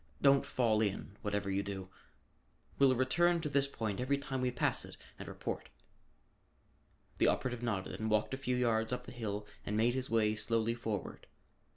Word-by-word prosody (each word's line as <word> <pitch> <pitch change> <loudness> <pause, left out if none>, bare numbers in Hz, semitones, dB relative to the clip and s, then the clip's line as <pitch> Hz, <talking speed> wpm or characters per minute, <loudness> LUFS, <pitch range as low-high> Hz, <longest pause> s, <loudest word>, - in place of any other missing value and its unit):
Don't 140 -1 +5
fall 110 -4 +2
in, 100 -1 -2
whatever 105 -1 -1
you 95 +1 +1
do. 95 -1 -5 0.9
We'll 135 -2 +6
return 170 +8 +3
to 150 - -2
this 140 -1 +3
point 110 -7 -3
every 140 +3 +1
time 135 -2 -3
we 125 - +2
pass 125 - 0
it - - -11 0.2
and - - -7
report." - - -5 1.5
The - - +5
operative 125 -2 0
nodded 105 -6 -2
and 110 0 -1
walked 110 +3 +1
a - - -1
few 125 -1 -1
yards 115 -2 +1
up 125 - -3
the - - -9
hill 105 -4 -4 0.2
and 105 - -2
made 115 +2 +3
his 130 0 -1
way 110 -2 +3
slowly 115 +2 +1
forward. 110 -4 -4
115 Hz, 180 wpm, -34 LUFS, 105-130 Hz, 1.5 s, We'll